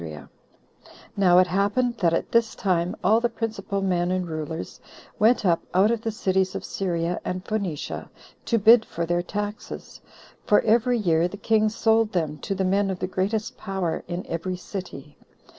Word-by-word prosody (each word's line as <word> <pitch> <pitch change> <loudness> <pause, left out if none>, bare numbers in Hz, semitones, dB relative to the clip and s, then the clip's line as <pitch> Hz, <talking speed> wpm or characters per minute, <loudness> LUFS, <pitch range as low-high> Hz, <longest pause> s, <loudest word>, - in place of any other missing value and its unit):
Now 180 -3 +5
it 185 - +7
happened 205 +7 0
that 170 -4 +3
at 165 - -1
this 230 -1 +2
time 180 -2 0
all 220 +5 +4
the 240 - +1
principal 215 -4 -3
men 175 -2 +1
and 185 -1 -1
rulers 160 0 -5 0.4
went 220 0 +4
up 170 -2 +3
out 200 +4 +5
of 235 -2 -1
the 225 - -2
cities 190 -3 0
of - - -4
Syria 175 -2 -2
and 180 0 -4
Phoenicia, 195 -9 -3 0.4
to 230 - +2
bid 225 +2 +7
for 170 -5 -4
their 175 +1 0
taxes; 205 +3 -6 0.4
for 210 - +4
every 240 +2 +3
year 170 -5 +2
the 200 - -9
king 215 0 +2
sold 225 0 +2
them 155 -4 -1
to 195 - -3
the 190 0 0
men 195 +2 +2
of 190 - -2
the - - -2
greatest 200 +4 -2
power 190 -5 -3
in 175 +1 -4
every 175 +2 -3
city. 180 -7 -8
190 Hz, 175 wpm, -24 LUFS, 175-215 Hz, 0.4 s, it